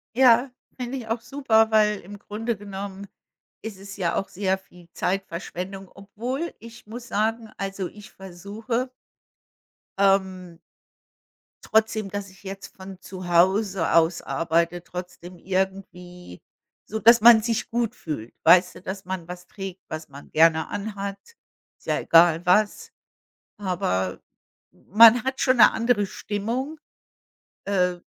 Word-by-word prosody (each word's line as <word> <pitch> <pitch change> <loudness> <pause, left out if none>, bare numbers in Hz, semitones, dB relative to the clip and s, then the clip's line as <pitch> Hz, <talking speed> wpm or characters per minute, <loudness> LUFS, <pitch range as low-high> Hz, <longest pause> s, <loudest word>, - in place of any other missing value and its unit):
Ja, 250 0 +5 0.3
finde 250 +2 -4
ich 230 - -9
auch 225 +1 -2
super, 230 -4 +2
weil 210 -1 +3
im 205 +3 -11
Grunde 225 +3 -4
genommen 200 0 -8 0.6
ist 210 -3 -7
es 200 +1 -10
ja 175 -4 -1
auch 195 - -2
sehr 190 0 -1
viel 180 -2 -19
Zeitverschwendung. 190 +1 -4
Obwohl, 245 +11 -5
ich 230 +1 -13
muss 240 +3 -9
sagen, 220 +2 -1
also 195 -1 -4
ich 210 0 -14
versuche 210 +7 -5 1.1
ähm 190 -3 +1 1.1
trotzdem, 220 -2 +1
dass 205 0 -5
ich 190 +2 -20
jetzt 195 0 -9
von 190 -1 -10
zu 185 -1 -9
Hause 185 +1 +2
aus 165 +1 +3
arbeite, 170 +1 -1
trotzdem 180 0 -9
irgendwie 180 - -4 0.4
so 220 - -4
dass 230 +1 +6
man 230 0 +8
sich 230 +1 -2
gut 235 0 -1
fühlt, 135 - -6
weißt 180 +2 +5
du? - - -12
Dass 190 +1 -6
man 185 -2 -5
was 180 0 -9
trägt, 195 -2 -8
was 155 0 -7
man 140 +1 -13
gerne 160 0 +4
an 205 +1 -5
hat. 200 0 -4 0.6
Ist - - -24
ja - - +1
egal 165 +1 +5
was, 205 +4 +2 0.7
aber 180 - -2 0.5
man 230 +4 +6
hat 265 0 -3
schon 255 -1 +3
'ne 230 - +7
andere 225 -2 +1
Stimmung, 235 +11 -4 0.9
äh 180 -3 +1
195 Hz, 135 wpm, -24 LUFS, 180-220 Hz, 1.1 s, man